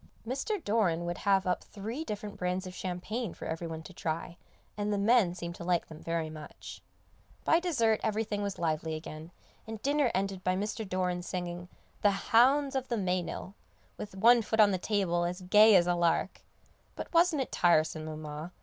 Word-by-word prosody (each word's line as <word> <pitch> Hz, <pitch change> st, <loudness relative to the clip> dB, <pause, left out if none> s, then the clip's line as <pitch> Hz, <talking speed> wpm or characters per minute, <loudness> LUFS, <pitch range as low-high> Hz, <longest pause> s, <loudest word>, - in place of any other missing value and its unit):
Mr. 275 Hz, -, -2 dB
Doran 190 Hz, -6 st, +1 dB
would 175 Hz, +1 st, -3 dB
have 195 Hz, -1 st, +4 dB
up 180 Hz, -1 st, 0 dB
three 225 Hz, +9 st, -6 dB
different 210 Hz, -5 st, -6 dB
brands 180 Hz, +1 st, -2 dB
of 185 Hz, -, -7 dB
champagne 185 Hz, +4 st, -4 dB
for -, -, -8 dB
every 165 Hz, +1 st, -4 dB
one 160 Hz, -1 st, -6 dB
to 175 Hz, -, -11 dB
try, 165 Hz, +1 st, -4 dB, 0.4 s
and 210 Hz, 0 st, -2 dB
the 205 Hz, -, +1 dB
men 200 Hz, -3 st, +3 dB
seemed 170 Hz, -1 st, -5 dB
to 170 Hz, -, -9 dB
like 175 Hz, -1 st, 0 dB
them 155 Hz, -1 st, -11 dB
very 165 Hz, -1 st, -2 dB
much. 155 Hz, -1 st, -10 dB, 0.6 s
By 325 Hz, -, +4 dB
dessert 235 Hz, -12 st, +1 dB
everything 215 Hz, -1 st, -1 dB
was 200 Hz, -1 st, -3 dB
lively 160 Hz, -1 st, -1 dB
again, 155 Hz, 0 st, -8 dB, 0.4 s
and 220 Hz, -1 st, -6 dB
dinner 285 Hz, -2 st, +2 dB
ended 190 Hz, -1 st, -2 dB
by 185 Hz, 0 st, +1 dB
Mr. 210 Hz, +1 st, -3 dB
Doran 180 Hz, -1 st, -1 dB
singing 175 Hz, -1 st, -5 dB, 0.3 s
"The 200 Hz, -1 st, +1 dB
hounds 270 Hz, +4 st, +5 dB
of 265 Hz, -1 st, -1 dB
the 235 Hz, -, -1 dB
Meynell," 185 Hz, -1 st, -2 dB, 0.4 s
with 205 Hz, -, -8 dB
one 235 Hz, +4 st, +6 dB
foot 220 Hz, +1 st, -2 dB
on 210 Hz, -1 st, +7 dB
the 185 Hz, -, -1 dB
table 185 Hz, -4 st, 0 dB
as 180 Hz, +2 st, -3 dB
gay 210 Hz, +3 st, +6 dB
as 175 Hz, -2 st, +6 dB
a 175 Hz, -, +2 dB
lark. 170 Hz, -1 st, 0 dB, 0.5 s
But -, -, -7 dB
wasn't 335 Hz, -4 st, +4 dB
it -, -, -13 dB
tiresome, 155 Hz, -2 st, +2 dB
Mamma? 155 Hz, +2 st, -7 dB
185 Hz, 185 wpm, -30 LUFS, 175-220 Hz, 0.6 s, on